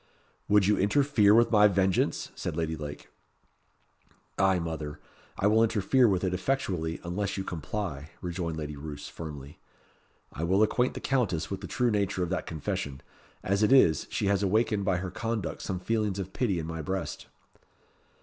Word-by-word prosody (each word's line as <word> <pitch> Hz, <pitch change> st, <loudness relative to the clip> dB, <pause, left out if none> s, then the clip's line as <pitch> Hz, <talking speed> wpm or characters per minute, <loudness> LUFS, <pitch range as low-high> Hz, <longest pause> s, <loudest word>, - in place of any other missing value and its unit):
"Would 105 Hz, -2 st, +5 dB
you 105 Hz, +2 st, +3 dB
interfere 110 Hz, -1 st, +4 dB
with 115 Hz, 0 st, +4 dB
my 105 Hz, -2 st, +7 dB
vengeance?" 95 Hz, -2 st, +1 dB
said 80 Hz, -, -4 dB
Lady 80 Hz, -1 st, -1 dB
Lake. 75 Hz, -1 st, -8 dB, 1.3 s
"Ay, 95 Hz, -1 st, +4 dB
mother, 80 Hz, -3 st, -4 dB, 0.4 s
I -, -, -1 dB
will 110 Hz, +2 st, +5 dB
interfere 115 Hz, +3 st, +3 dB
with 95 Hz, -3 st, +1 dB
it 95 Hz, -1 st, 0 dB
effectually 90 Hz, -6 st, -1 dB
unless 100 Hz, +4 st, -2 dB
you 95 Hz, -, -2 dB
comply," 80 Hz, -3 st, -4 dB
rejoined 85 Hz, -2 st, -3 dB
Lady 75 Hz, -1 st, -5 dB
Roos, 70 Hz, 0 st, -7 dB
firmly. 75 Hz, -3 st, -9 dB, 0.7 s
"I 80 Hz, -, -4 dB
will 95 Hz, +5 st, +3 dB
acquaint 125 Hz, +4 st, +1 dB
the -, -, -5 dB
Countess 115 Hz, -, 0 dB
with 95 Hz, -, -4 dB
the -, -, -6 dB
true 125 Hz, -2 st, +1 dB
nature 100 Hz, -3 st, 0 dB
of 90 Hz, -, -3 dB
that 95 Hz, -, -2 dB
confession. 70 Hz, -3 st, -4 dB, 0.4 s
As 100 Hz, +2 st, +1 dB
it 105 Hz, -, +3 dB
is, 85 Hz, -, +5 dB
she -, -, -1 dB
has 100 Hz, -1 st, +2 dB
awakened 105 Hz, 0 st, +1 dB
by 95 Hz, -2 st, +2 dB
her 90 Hz, 0 st, -4 dB
conduct 115 Hz, 0 st, -3 dB
some 90 Hz, -, -3 dB
feelings 105 Hz, -1 st, -1 dB
of 95 Hz, -1 st, -5 dB
pity 105 Hz, -8 st, 0 dB
in 80 Hz, -, -3 dB
my 80 Hz, 0 st, -5 dB
breast." 80 Hz, -5 st, -4 dB
95 Hz, 170 wpm, -28 LUFS, 80-105 Hz, 1.3 s, my